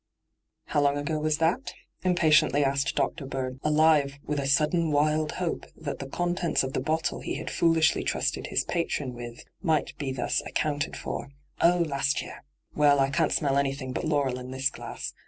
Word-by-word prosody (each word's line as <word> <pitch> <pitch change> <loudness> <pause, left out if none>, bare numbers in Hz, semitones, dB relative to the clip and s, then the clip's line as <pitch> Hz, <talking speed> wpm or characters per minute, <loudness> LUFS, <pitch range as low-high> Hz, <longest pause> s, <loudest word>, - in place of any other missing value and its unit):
' - - -55
How 145 - +4
long 140 0 +3 0.3
was 155 0 +1
that 165 +2 +3
ago 270 - -8 0.3
V 185 - 0
impatiently 155 -4 +4
asked 140 0 0
Dr. 135 - -1
Bird, 130 -1 -4
alive 150 -2 +3
with 150 -1 -1
a 135 - -2
sudden 155 +4 +2
wild 150 +1 +1
hope 180 -3 -3
that 150 -3 -5
the 135 - -5
contents 175 0 0
of 130 0 -4
the - - 0
bottle 155 +5 -1
he - - -4
had - - -5
fooUshly 165 -2 +3
trusted - - -1
his - - 0
patron 150 -6 -2
with 120 -1 -9 0.2
might 160 -3 0
be 140 -2 -2
thus 130 -2 -1
accounted 145 0 -1
for. - - -5 0.2
' - - -15
Oh, 175 0 +4
last 140 0 0
year - - -10
I - - -37 0.4
Well, 145 -1 +5
I 135 0 +2
can't 155 +3 +1
smell 140 -2 +2
any 135 -1 0
thing 130 -2 -6
but - - -3
laurel 140 -5 0
in 125 0 -8
this 130 +1 0
glass. - - -7
145 Hz, 200 wpm, -27 LUFS, 135-160 Hz, 0.4 s, Well